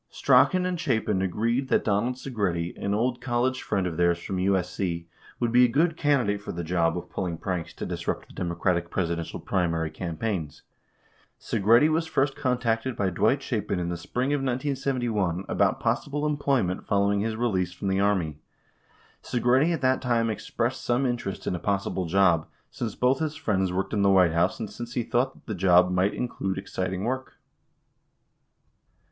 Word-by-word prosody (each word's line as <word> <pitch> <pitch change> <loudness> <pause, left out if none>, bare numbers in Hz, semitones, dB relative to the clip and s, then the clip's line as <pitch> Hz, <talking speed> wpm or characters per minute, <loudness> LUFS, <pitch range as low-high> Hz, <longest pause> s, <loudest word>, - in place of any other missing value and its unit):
3 - - -22
Strachan 185 -1 +4
and 180 -2 -2
Chapin 110 -8 0
agreed 115 +8 0
that - - +3
Donald 115 +4 +1
Segretti, 100 -10 -2
an 100 0 0
old 120 +3 0
college 130 +1 0
friend 95 -2 -1
of 85 -3 -3
theirs 85 0 +3
from 95 +2 -5
USC, 90 -2 -1 0.3
would 120 -1 0
be 125 +1 +6
a - - +6
good 160 +7 +2
candidate 125 -10 +1
for - - -6
the 85 0 -4
job 85 0 +1
of 90 - -7
pulling 90 -3 -3
pranks 85 -2 -3
to - - -5
disrupt - - -3
the - - -16
Democratic 85 0 -1
Presidential 85 -3 -2
primary 80 -4 -1
cam 85 -3 -5
paigns. 95 -10 -3 0.8
Segretti 115 +7 +4
was 160 +1 0
first 135 -3 +1
contacted 125 -3 0
by 95 -2 0
Dwight 120 +10 +2
Chapin 105 -4 -2
in 85 -1 -2
the 85 - -2
spring 125 - -2
of 145 - +1
1971 120 - -1
about - - +1
possible 145 +1 -1
employment 140 -10 0
following 100 0 +2
his 110 +2 -1
release 95 -7 0
from 90 +2 -6
the 95 0 +1
Army. 90 -7 +1 0.8
4 120 - -2
Segretti 130 +7 +3
at 165 -5 -1
that 130 0 +2
time 115 -3 +1
expressed 120 +4 -3
some 120 +3 +1
interest 120 -6 -3
in - - -1
a 90 - -3
possible 100 -2 -1
job, 85 -3 +3 0.2
since 115 -4 -4
both 125 +2 +2
his 155 -1 -2
friends 95 -7 0
worked 95 +4 -2
in 105 - +1
the 100 - +4
White 90 -4 +5
House 85 +3 +1
and 110 - -3
since 120 +1 -7
he 120 - 0
thought 125 +4 0
that - - -21
the 110 - -4
job 90 -1 +4
might 90 +2 +1
include 95 -6 -3
exciting 95 -1 -3
work. 130 +3 -3
105 Hz, 180 wpm, -26 LUFS, 90-125 Hz, 0.8 s, be